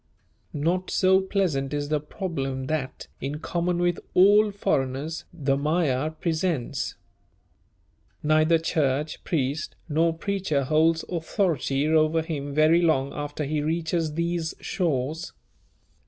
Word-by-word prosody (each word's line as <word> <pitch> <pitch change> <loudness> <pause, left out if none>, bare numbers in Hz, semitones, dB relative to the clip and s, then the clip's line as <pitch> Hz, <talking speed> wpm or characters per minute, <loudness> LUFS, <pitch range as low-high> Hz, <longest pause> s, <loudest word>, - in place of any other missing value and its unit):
Not 170 +5 -1
so 190 0 +4
pleasant 160 -8 -1
is 145 0 -2
the 150 -1 +1
problem 140 -5 -4
that, 135 -2 -3
in 140 +3 -3
common 170 +2 -1
with 175 0 +1 0.2
all 205 +3 +6
foreigners, 145 -5 -2
the 140 -5 0
Magyar 150 -1 +1
presents. 160 -3 -2 1.3
Neither 155 +2 +4
church, 150 -2 -1
priest, 145 -1 -2
nor 165 +2 +2
preacher 190 -7 -1
holds 160 +3 +2
authority 160 - 0
over 160 +1 +3
him 145 -3 -4
very 155 +4 +4
long 140 -5 +2
after 145 +1 -4
he 150 +1 -1
reaches 160 0 -1
these 170 -1 -1
shores. 155 -1 -2
155 Hz, 115 wpm, -25 LUFS, 145-170 Hz, 1.3 s, all